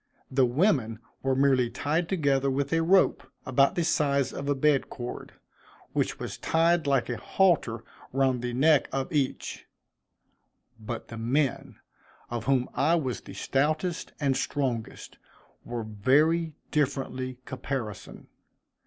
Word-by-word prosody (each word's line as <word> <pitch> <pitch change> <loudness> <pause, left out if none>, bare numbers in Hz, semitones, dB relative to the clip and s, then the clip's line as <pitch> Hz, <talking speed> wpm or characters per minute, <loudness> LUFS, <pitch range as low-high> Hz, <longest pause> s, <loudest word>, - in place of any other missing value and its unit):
The 130 -1 +3
women 125 - +1 0.2
were 135 0 +1
merely 130 -3 +3
tied 150 +7 -1
together 140 -6 +1
with 140 +2 -1
a 165 - +3
rope, 185 +3 +4 0.2
about 135 +2 +3
the 175 - +1
size 140 -4 +1
of 140 +1 -4
a 145 - +2
bed 140 0 +2
cord, 120 0 -7 0.6
which - - 0
was - - -6
tied 165 -1 +2
like 135 -3 +2
a 120 - -3
halter 120 - +1 0.3
round 130 -2 +1
the 125 0 -2
neck 150 +3 +4
of 135 +5 -3
each; 140 -3 -2 1.1
but 115 +2 -6
the 115 - -7
men, 130 +4 0 0.6
of 120 -2 -3
whom 130 -2 +2
I 160 +4 +3
was 130 -7 -2
the - - -11
stoutest 155 +5 -1
and 140 -3 +1
strongest, 130 -5 -3 0.4
were 120 -1 -4
very 150 +10 +2 0.2
differently 130 -3 -1
caparisoned. 130 -5 -5
135 Hz, 135 wpm, -27 LUFS, 125-155 Hz, 1.1 s, rope